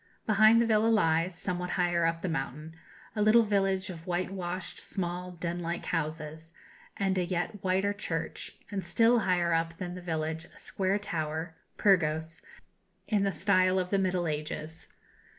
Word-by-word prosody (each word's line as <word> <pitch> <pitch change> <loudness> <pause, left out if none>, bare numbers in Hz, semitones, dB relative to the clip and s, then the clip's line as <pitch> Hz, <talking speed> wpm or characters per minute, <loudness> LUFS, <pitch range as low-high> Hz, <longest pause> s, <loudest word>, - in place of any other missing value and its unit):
Behind 215 +1 +6
the 235 - +4
villa 220 -1 +3
lies, 175 -5 +2
somewhat 180 -1 -3
higher 175 -2 +2
up 165 0 -2
the - - 0
mountain, 160 -1 -4 0.4
a 210 - 0
little 215 +2 +6
village 195 -3 +1
of 165 -1 -11
white 180 +1 -1
washed, 185 -1 -4
small, 180 -1 -4
den 170 0 -4
like 170 0 -3
houses, 160 0 -3 0.5
and 190 -1 +1
a - - +1
yet 180 +3 -3
whiter 190 +2 +1
church; 165 -5 -4 0.2
and 195 -2 -2
still 230 +7 +4
higher 175 -4 +1
up 165 0 0
than 180 -1 -5
the 180 - -7
village, 160 -2 -3
a - - -20
square 195 +1 -1
tower 160 -4 -3 0.2
Pyrgos 160 -5 +2 0.7
in 210 -2 +2
the 195 0 +2
style 185 +1 +3
of 180 -1 -1
the 200 - +3
Middle 185 -2 0
Ages. 155 +1 -5
180 Hz, 165 wpm, -30 LUFS, 165-195 Hz, 0.7 s, Behind